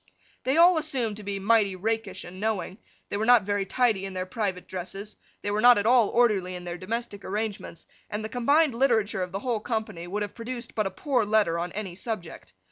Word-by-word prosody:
They 265 +4 +2
all 345 0 +7
assumed 250 -9 -2
to 210 - -9
be 200 0 -3
mighty 200 -1 +3
rakish 210 -1 -2
and 185 +2 -10
knowing, 205 -2 -2 0.3
they - - -2
were 215 - -1
not 245 -3 +6
very 205 0 -1
tidy 230 -5 +1
in 195 -1 -5
their 185 0 -2
private 190 -3 -3
dresses, 195 +3 -6 0.3
they 205 - -1
were 210 +1 0
not 245 +1 +8
at 205 - 0
all 240 -2 +5
orderly 205 -7 +2
in 180 - -7
their 175 0 -5
domestic 210 0 -4
arrangements, 205 -4 -4 0.2
and 215 +1 -3
the - - -2
combined 280 +5 +3
literature 230 -6 +2
of 180 -1 -3
the 195 - -2
whole 240 -4 -1
company 220 -6 -4
would 205 +3 -2
have 205 - -6
produced 235 0 -6
but 215 -2 0
a - - -2
poor 250 +5 0
letter 205 -5 +2
on 175 +1 -3
any 195 -3 -5
subject. 190 -3 -6
210 Hz, 215 wpm, -27 LUFS, 190-235 Hz, 0.3 s, not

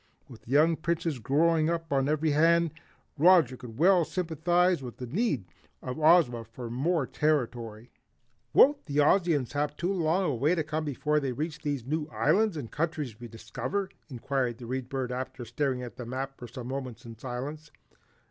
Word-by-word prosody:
With 115 -3 -14
young 155 +5 +4
Princes 165 -4 -1
growing 155 +6 +2
up 165 -3 -2
on 135 0 +2
every 155 +1 +1
hand, 165 +1 +3 0.5
Roger 165 -6 +6
could 120 -3 -11
well 180 +3 +5
sympathize 175 0 +1
with 125 -3 -8
the 125 - -5
need 145 - -1 0.4
of 125 +3 -5
Ozma 155 -7 +4
for 115 +1 -8
more 150 +4 0
territory. 120 -7 -1 0.6
"Won't 285 -7 +5
the 145 -1 -3
Ozians 150 -3 +3
have 145 0 -2
too 180 +4 -1
long 175 +1 +1
a 155 -6 0
way 145 +8 +2
to 160 - 0
come 155 +1 -3
before 150 +1 0
they 135 -3 -2
reach 155 +4 -4
these 140 -5 -3
new 150 +2 -2
islands 205 +3 +2
and 125 -6 -6
countries 150 -7 -3
we 120 - -8
discover?" 125 - -4 0.2
inquired 125 -2 -2
the 120 - -9
Read 130 +1 -4
Bird, 130 -2 -3
after 130 -1 -5
staring 130 -2 -1
at 120 - -9
the 125 - -6
map 135 +2 -4
for 120 - -9
some 120 +1 -8
moments 130 -2 -6
in 115 -1 -9
silence. 140 +5 -6
145 Hz, 175 wpm, -28 LUFS, 125-165 Hz, 0.6 s, Roger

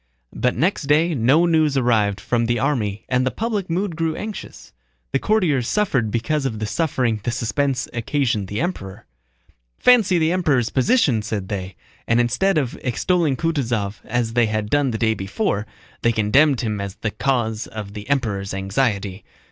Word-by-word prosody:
But 125 - 0
next 155 - 0
day 160 +4 +3
no 140 +6 +3
news 155 -4 +2
arrived 110 -5 +2
from 120 -1 0
the 120 0 +1
army 110 -5 -1
and 125 0 +1
the 130 - +1
public 215 - -3
mood 180 +1 -1
grew 160 -1 -1
anxious. 215 -1 -8 0.4
The - - +1
courtiers 165 - +1
suffered 135 - +1
because 145 +7 -1
of 110 -4 -4
the 110 - -3
suffering 125 -4 0
the 120 - -2
suspense 130 +3 -1
occasioned 120 -4 -1
the 100 +6 -3
Emperor. 100 - -4 0.7
"Fancy 225 -8 +5
the 160 0 +2
Emperor's 150 -10 +1
position!" 135 - +2
said 105 -3 -4
they, 95 -3 -4 0.3
and 115 +1 +3
instead 145 +11 +2
of 135 -5 -1
extolling 150 +3 +1
Kutúzov 120 - -1
as 115 -1 -2
they 120 -1 +3
had 110 -1 -2
done 145 -2 +2
the 115 - -2
day 110 0 +2
before, 105 - -2 0.3
they 120 - +3
condemned 120 +6 +3
him 105 -4 -2
as 100 0 -5
the 110 - -3
cause 115 -2 -1
of 105 -2 -7
the 105 +4 -8
Emperor's 100 -9 -1
anxiety. 100 -1 -1
125 Hz, 170 wpm, -21 LUFS, 110-155 Hz, 0.7 s, Fancy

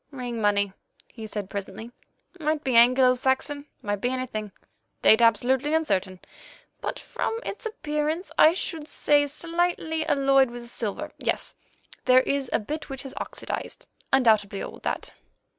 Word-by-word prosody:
"Ring 245 -5 -5
money," 200 -2 +2 0.4
he 220 -2 -8
said 210 -2 -4
presently, 200 +4 -6 0.5
"might 310 -1 0
be 260 -3 0
Anglo 250 +2 +6
Saxon, 265 +3 0 0.2
might 205 -1 -2
be 245 - +1
anything; 250 -5 -3 0.5
date 220 +2 +7
absolutely 255 +6 +3
uncertain, 190 - 0 0.6
but - - -3
from 450 - -3
its 445 - -4
appearance 310 -3 -2
I 315 - +7
should 325 -4 -4
say 290 -1 +2
slightly 330 +1 -1
alloyed 275 -2 +4
with 240 0 -8
silver; 240 +6 -4
yes, - - -1 0.5
there 255 0 +7
is 275 -1 -1
a - - +3
bit 295 +8 -5
which 270 -1 -5
has 270 -1 -8
oxydized—undoubtedly 220 -8 -1
old, - - -8
that." - - -3
260 Hz, 140 wpm, -26 LUFS, 220-300 Hz, 0.6 s, date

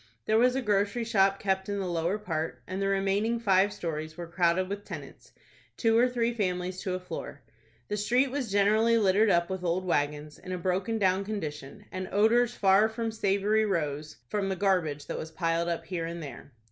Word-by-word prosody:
There 220 +1 +3
was 250 +1 +4
a 265 - -1
grocery 205 +2 +1
shop 195 -4 +3
kept 190 0 -1
in 200 - -1
the 195 - -2
lower 175 +2 -1
part, 160 - -4
and 185 +2 -4
the 195 - +1
remaining 195 +4 +1
five 200 -2 +3
stories 155 -3 -5
were 175 - -5
crowded 170 +2 +1
with 200 +1 -5
tenants, - - -10 0.5
two 225 -1 +2
or 245 +2 +5
three 240 -1 0
families 185 -3 -2
to 185 -3 -2
a - - -3
floor. 180 -5 -7 0.4
The 210 - -2
street 245 +6 +2
was 265 -6 -3
generally 215 +3 +4
littered 210 +1 +4
up 170 0 +2
with 190 -1 -4
old 180 +2 0
wagons, 150 -2 -1
in 185 - -9
a - - -2
broken 185 +5 -1
down 190 -2 +2
condition, 160 -3 -6
and 185 -1 -5
odors 230 +4 +3
far 195 +2 +4
from 225 0 -3
savory 210 0 +1
rose 150 -5 -2
from 200 +3 -1
the 190 - -1
garbage 175 -7 0
that - - -4
was 160 - -6
piled 165 +1 -1
up 170 - -3
here 170 -3 -3
and 170 0 -6
there. 140 0 -9
195 Hz, 200 wpm, -28 LUFS, 170-215 Hz, 0.5 s, or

